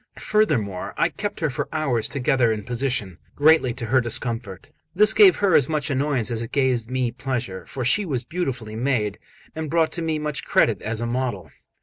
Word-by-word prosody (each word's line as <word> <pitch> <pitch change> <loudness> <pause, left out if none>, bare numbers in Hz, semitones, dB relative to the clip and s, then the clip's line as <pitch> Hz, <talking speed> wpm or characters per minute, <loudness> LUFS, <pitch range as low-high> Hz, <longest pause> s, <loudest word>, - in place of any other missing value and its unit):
Furthermore, 125 - 0
I - - +2
kept 205 -3 -5
her 160 - +1
for 125 - -4
hours 135 -8 -1
together 130 -4 +1
in 105 -1 -3
position, 120 - -3 0.2
greatly 150 -3 +4
to 125 - -5
her 130 +3 +3
discomfort. 115 -5 -3 0.2
This 210 +3 +5
gave 395 -3 +7
her 200 -3 +1
as 140 -2 +4
much 155 -1 -1
annoyance 135 -4 0
as 115 -1 -2
it 115 - -6
gave 130 -4 0
me 130 -2 -1
pleasure; 120 -6 -4
for 130 -3 -5
she 205 - +3
was 135 -9 -2
beautifully 125 -8 -4
made, 115 -4 -1 0.4
and 160 -1 -4
brought 165 +1 +1
me 160 -2 -1
much 150 -2 -4
credit 115 - +2
as 110 +1 -3
a - - -1
model. 120 - -3
130 Hz, 190 wpm, -23 LUFS, 115-150 Hz, 0.4 s, gave